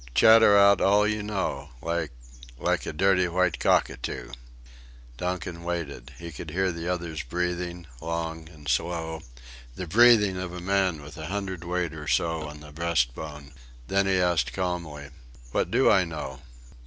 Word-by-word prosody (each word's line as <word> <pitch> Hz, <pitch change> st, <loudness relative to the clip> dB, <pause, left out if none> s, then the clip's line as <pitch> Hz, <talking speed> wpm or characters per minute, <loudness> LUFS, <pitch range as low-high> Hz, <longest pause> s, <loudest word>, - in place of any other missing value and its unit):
Chatter 110 Hz, -2 st, +7 dB
out 100 Hz, 0 st, +6 dB
all 105 Hz, +1 st, +4 dB
you 105 Hz, 0 st, 0 dB
know 95 Hz, -9 st, -3 dB
like... 85 Hz, +1 st, -2 dB, 0.5 s
like -, -, 0 dB
a -, -, -2 dB
dirty 90 Hz, +2 st, +3 dB
white 90 Hz, -1 st, +1 dB
cockatoo." -, -, 0 dB, 0.9 s
Donkin 90 Hz, 0 st, -4 dB
waited. 80 Hz, -7 st, -4 dB
He 85 Hz, 0 st, -8 dB
could 80 Hz, +1 st, -8 dB
hear 95 Hz, +4 st, 0 dB
the 85 Hz, 0 st, -5 dB
other's 85 Hz, -3 st, -2 dB
breathing, 90 Hz, 0 st, -3 dB, 0.2 s
long 80 Hz, -1 st, -4 dB
and 75 Hz, -4 st, -14 dB
slow; 80 Hz, +3 st, -1 dB, 0.5 s
the 90 Hz, -, -5 dB
breathing 105 Hz, 0 st, +5 dB
of 90 Hz, -1 st, -5 dB
a 90 Hz, -, -5 dB
man 95 Hz, -4 st, 0 dB
with 75 Hz, +2 st, -11 dB
a 80 Hz, -1 st, -6 dB
hundredweight 90 Hz, -3 st, -3 dB
or 75 Hz, -1 st, -8 dB
so 80 Hz, -2 st, 0 dB
on 75 Hz, 0 st, -11 dB
the 75 Hz, 0 st, -12 dB
breastbone. 75 Hz, -2 st, -2 dB, 0.4 s
Then 100 Hz, 0 st, +2 dB
he 95 Hz, -1 st, +3 dB
asked 85 Hz, -7 st, +1 dB
calmly: 85 Hz, -6 st, -4 dB, 0.4 s
"What -, -, 0 dB
do -, -, +4 dB
I 95 Hz, -, +5 dB
know?" 75 Hz, -5 st, -6 dB
85 Hz, 155 wpm, -26 LUFS, 80-95 Hz, 0.9 s, Chatter